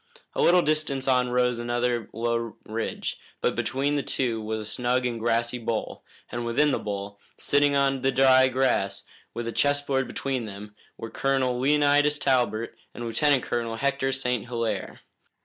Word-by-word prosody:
A - - -1
little 175 0 +5
distance 150 -3 0
on 125 -1 +3
rose 125 -1 +1
another 120 0 -1
low 115 0 -2
ridge, 110 +1 -4 0.2
but - - 0
between 135 +3 -1
the - - +1
two 120 -5 -1
was 110 0 -3
a - - -3
snug 125 +2 +1
and 120 -2 -2
grassy 120 +1 0
bowl, 115 -1 -3 0.3
and 120 0 -3
within 140 +6 +2
the - - 0
bowl, 100 -1 -5 0.2
sitting 145 0 +2
on 135 -1 +2
the 135 +1 +2
dry 130 0 +5
grass, 130 -6 0 0.3
with 120 0 -4
a - - -2
chessboard 145 -1 +1
between 130 -4 -3
them, 105 0 -9 0.2
were 115 - -7
Colonel 130 -2 0
Leonidas 145 +2 +3
Talbot 125 -5 +1 0.2
and 120 - -5
Lieutenant 130 +4 +2
Colonel 115 -1 -2
Hector 135 +1 0
St. 125 -4 -1
Hilaire. 115 -4 -3
125 Hz, 165 wpm, -26 LUFS, 115-135 Hz, 0.3 s, little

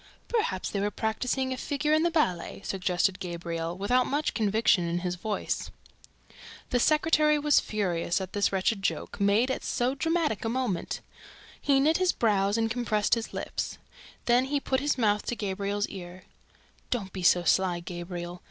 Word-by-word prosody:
"Perhaps 310 - -1
they 200 - -1
were 205 +1 +1
practising 250 +5 -1
a - - -5
figure 295 +3 -1
in 310 - +4
the 340 - +3
ballet," 195 - -1
suggested 185 0 0
Gabriel, 170 -1 -4
without 245 +6 +2
much 290 +2 0
conviction 210 -4 +2
in 170 +1 -1
his 180 -1 -1
voice. 205 +4 -3 1.0
The 250 - +3
secretary 305 +2 +4
was 295 0 +4
furious 180 -5 -1
at 190 -1 -6
this 205 -1 +2
wretched 195 +2 0
joke, 165 -5 -2
made 210 +6 +3
at - - -3
so 245 +2 0
dramatic 325 - 0
a 225 - -1
moment. 235 -7 -2 0.6
He 275 -2 +3
knit 310 +4 +3
his 370 -1 +2
brows 205 -2 +2
and 225 0 0
contracted 220 -3 +1
his 230 -1 0
lips. - - -4 0.5
Then 245 +2 +4
he 285 +1 0
put 265 -1 0
his 290 +1 0
mouth 210 -3 +2
to 240 - -1
Gabriel's 200 0 -2
ear: 180 -1 -9 0.7
"Don't 200 -6 -2
be 190 - -5
so 175 0 +4
sly, 180 0 +2
Gabriel. 175 0 -6
210 Hz, 170 wpm, -28 LUFS, 185-260 Hz, 1.0 s, in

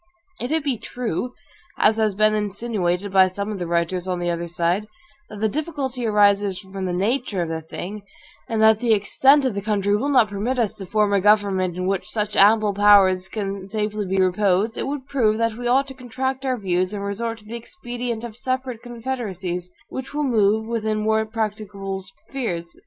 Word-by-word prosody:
If 245 - -3
it 315 0 0
be 265 -6 -1
true, 245 0 -4 0.4
as 220 +1 +4
has 215 -3 +1
been 215 +1 +3
insinuated 205 -3 -1
by 190 -1 +7
some 200 +3 -4
of 205 - -5
the 175 - -3
writers 170 +2 0
on 180 -1 -1
the 175 0 -1
other 170 0 -3
side, 175 +4 0 0.4
that 210 -1 -9
the 220 - +3
difficulty 270 -3 -3
arises 205 -2 +3
from 190 0 -6
the 180 - -1
nature 200 +1 0
of 165 - -5
the 160 0 -3
thing, 185 +6 -7 0.5
and 220 -1 +1
that 220 -1 +6
the 230 -2 +3
extent 270 +7 +4
of 255 - +1
the 200 - -3
country 205 -1 +1
will 265 +7 0
not 250 -6 +4
permit 210 +6 -2
us 230 -4 +1
to 195 -3 -7
form 210 0 +2
a 200 - +3
government 195 -3 +3
in 185 - -2
which 195 +1 -1
such 210 -1 -2
ample 210 +1 +5
powers 195 -2 +5
can 195 -2 -4
safely 210 -1 -2
be 190 +1 -1
reposed, 190 +3 +2
it - - -3
would 280 -1 -4
prove 230 -7 +1
that 230 -1 +1
we 245 +1 -4
ought 270 +3 +3
to - - -7
contract 260 +1 -3
our 255 -1 +1
views, 185 -2 0
and 200 - -4
resort 225 +3 -3
to 210 - -16
the 225 +2 -7
expedient 240 -3 -5
of 235 -3 -7
separate 255 -1 -3
confederacies, 210 -8 -4 0.2
which 265 +2 -6
will 300 - 0
move 220 -4 +2
within 220 -2 -1
more 220 0 +1
practicable 210 -3 -4
spheres. 185 -2 -5
210 Hz, 200 wpm, -23 LUFS, 190-235 Hz, 0.5 s, by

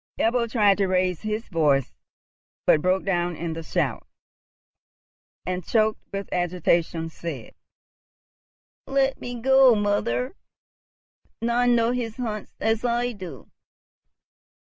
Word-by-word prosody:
Ebbo 235 +1 +1
tried 205 -4 +4
to 195 - +2
raise 185 -2 +1
his 215 +1 -3
voice, 145 -6 +2 0.7
but 150 - +5
broke 185 +2 +1
down 175 -3 0
in 165 +1 -4
the 165 - -5
shout, 160 - -2 1.4
and, 180 0 -3
choked 215 +3 +1
with 195 -1 -4
agitation, 170 -2 0
said, 160 -6 -7 1.3
"Let 270 0 +1
me 245 -1 -5
go, 265 0 +6
mother. 205 - 0 1.0
None 240 +1 +2
know 230 0 +2
his 235 -3 -3
haunts 220 -4 -5
as 225 0 0
I 240 0 0
do!" 180 - -10
205 Hz, 115 wpm, -25 LUFS, 170-235 Hz, 1.4 s, go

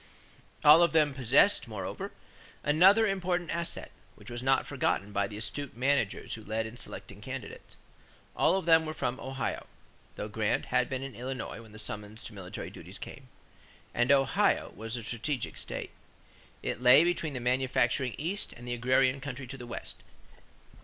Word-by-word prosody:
All 150 +3 +9
of 170 -2 +4
them 150 -3 +4
possessed, 135 - +4
moreover, 105 -3 -5 0.5
another 190 +9 +6
important 180 -3 -1
asset, 170 0 -2 0.2
which - - -12
was 120 0 -5
not 135 +1 +3
forgotten 105 -7 -1
by 100 -1 0
the 105 - -8
astute 120 +4 -3
managers 130 -5 0
who 110 - -7
led 110 +1 -2
in 110 +2 -8
selecting 105 -4 -8
candidates. 130 -1 -8 0.6
All - - +4
of 190 - -3
them 165 -1 +5
were 155 - -4
from 130 -2 -2
Ohio 135 0 -3 0.5
though - - -4
Grant - - 0
had - - +1
been 130 0 -3
in 135 -1 -6
Illinois 125 -1 -5
when 110 -2 -14
the 110 - -11
summons 105 0 -6
to 115 - -9
military 95 -3 -7
duties - - -10
came - - -9 0.7
and 120 +3 +2
Ohio 135 -2 +3
was 115 +3 -4
a 120 - -6
strategic 120 +4 -2
state. - - -5 0.7
It 120 - -3
lay 125 +5 +8
between 170 -3 0
the 125 - -3
manufacturing 125 0 +1
East 180 +7 -2
and 120 +1 -11
the 120 - -1
agrarian 130 +2 +2
country 135 -1 -5
to 130 +2 -7
the 120 -2 -9
West. - - -7
130 Hz, 170 wpm, -30 LUFS, 115-145 Hz, 0.7 s, All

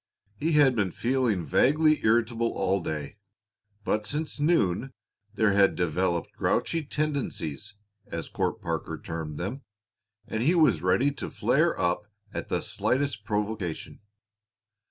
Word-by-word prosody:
He 155 +9 -1
had 145 -4 +5
been 105 -4 +1
feeling 120 -8 0
vaguely 155 - +3
irritable 115 +1 +2
all 95 0 0
day, 75 +3 -5 0.7
but 105 0 0
since 150 +1 -3
noon 135 - +1 0.4
there 110 0 +3
had 100 -1 +4
developed 85 0 0
grouchy 165 -1 0
tendencies, 135 - -3 0.3
as - - -5
Court - - -2
Parker - - -3
termed 80 -2 -6
them, 105 +10 -4 0.7
and 110 - -2
he 160 +9 +3
was 135 - +4
ready 120 +11 +3
to 140 - -6
flare - - +1
up 90 +4 0 0.3
at - - -5
the - - 0
slightest 130 -5 -1
provocation. 105 -5 -3
110 Hz, 130 wpm, -27 LUFS, 90-140 Hz, 0.7 s, had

